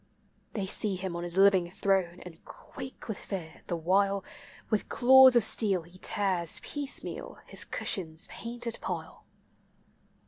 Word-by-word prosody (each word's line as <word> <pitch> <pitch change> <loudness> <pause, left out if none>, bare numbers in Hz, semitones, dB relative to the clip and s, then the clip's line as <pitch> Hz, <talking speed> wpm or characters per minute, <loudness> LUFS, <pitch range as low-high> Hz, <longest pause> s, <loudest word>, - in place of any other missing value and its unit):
They 205 -4 -2
see 200 +1 -1
him 185 -1 -5
on 170 - -4
his 175 +1 -3
living 190 -3 +5
throne, 185 -2 0
and 175 -2 -12
quake 260 - -10
with 220 -4 -4
fear, 170 -6 -7
the 175 - -2
while 195 +4 +1 0.5
With 215 - 0
claws 260 +1 +7
of 240 - +6
steel 195 -6 +4
he 175 +3 -14
tears 185 -6 0
piecemeal 290 -2 -5
hi* - - -10
cushion's 160 -4 -1
painted 235 0 -6
pile. - - -6
195 Hz, 140 wpm, -29 LUFS, 175-220 Hz, 0.5 s, claws